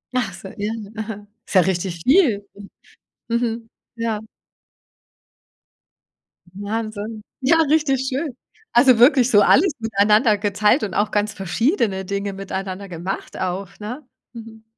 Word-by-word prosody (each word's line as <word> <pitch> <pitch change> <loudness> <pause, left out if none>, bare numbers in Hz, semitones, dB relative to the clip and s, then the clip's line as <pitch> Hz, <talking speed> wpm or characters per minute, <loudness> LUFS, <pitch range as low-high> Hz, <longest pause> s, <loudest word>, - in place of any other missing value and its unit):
Ach 230 -6 0
so, 190 +1 -10
ja, 205 +2 -2 0.2
aha. 215 -1 -6 0.2
Ist - - -7
ja 185 - +8
richtig 175 -2 -2
viel, 250 - +3 0.8
mhm, 230 -1 -1 0.3
ja. 225 -2 -2 2.3
Wahnsinn. 215 +1 -5 0.2
Ja, 300 +6 +4
richtig 275 -4 +2
schön. 270 -1 -3 0.4
Also, 245 0 +6
wirklich 255 -1 +6
so 205 -3 +6
alles 325 - +5
miteinander 215 0 +3
geteilt 210 +5 +2
und 200 -3 -3
auch 210 0 0
ganz 210 0 0
verschiedene 195 - 0
Dinge 200 +1 -3
miteinander 195 0 -5
gemacht 175 +2 -5
auch, 185 +1 -3
ne? 240 +8 -6 0.3
Mhm. 225 -1 -11
215 Hz, 120 wpm, -21 LUFS, 200-240 Hz, 2.3 s, ja